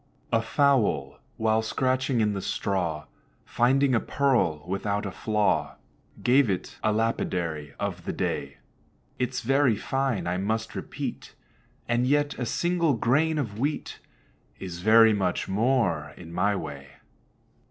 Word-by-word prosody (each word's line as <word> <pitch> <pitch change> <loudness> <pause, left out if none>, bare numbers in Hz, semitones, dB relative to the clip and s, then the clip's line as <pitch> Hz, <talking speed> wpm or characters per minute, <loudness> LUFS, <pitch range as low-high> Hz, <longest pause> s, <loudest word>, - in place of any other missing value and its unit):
A 115 - +4
Fowl, 115 - +1 0.2
while 110 0 +2
scratching 130 +2 0
in 105 -1 +2
the 100 - -3
straw, 85 -7 -2 0.4
Finding 135 +3 +2
a 115 - +4
pearl 120 - +1
without 100 +2 -2
a 95 - -3
flaw, 105 0 0 0.5
Gave 130 -1 +4
it 95 -2 -3
a 110 - +2
lapidary 85 -9 -2
of - - -4
the - - -2
day. - - -3 0.6
"It's 125 0 -1
very 135 -1 +3
fine, 135 0 -1
I 90 +1 -1
must 110 +4 -2
repeat; - - -6 0.5
And 120 +1 +1
yet 145 +1 +2
a 125 - -2
single 170 0 +1
grain 145 +8 +2
of 110 -7 -3
wheat 145 +4 -2 0.6
Is 90 -2 -7
very 110 +2 +6
much 95 -3 -1
more 100 - 0
in 85 -1 -10
my 100 +4 +1
way." 70 -5 -7
110 Hz, 135 wpm, -26 LUFS, 95-130 Hz, 0.6 s, very